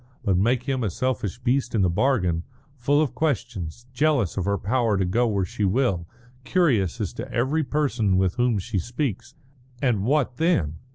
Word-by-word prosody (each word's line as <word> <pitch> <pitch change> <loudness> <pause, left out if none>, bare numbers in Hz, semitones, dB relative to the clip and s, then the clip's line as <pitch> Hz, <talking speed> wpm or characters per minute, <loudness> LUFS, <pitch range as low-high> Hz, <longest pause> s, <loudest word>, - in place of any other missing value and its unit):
But 95 - +3
make 120 +7 +2
him 130 -2 -1
a 105 - 0
selfish 115 -1 -2
beast 125 0 0
into 100 - +3
the - - +2
bargain, 90 -6 +1 0.3
full 145 +4 +2
of 140 - -3
questions, 120 - -2
jealous 135 - +1
of 95 - -2
her 100 0 +1
power 110 +1 +1
to 95 - +1
go 120 +7 +2
where 100 -4 0
she 105 - -4
will, 95 -4 +1 0.4
curious 130 - +1
as - - -3
to - - -7
every 135 +7 +1
person 130 -10 +1
with 95 -1 +2
whom 120 -3 +1
she 100 +1 -2
speaks 120 - -3 0.4
and 120 -7 +1
what 130 0 +1
then? 90 - +1
120 Hz, 180 wpm, -24 LUFS, 95-135 Hz, 0.4 s, But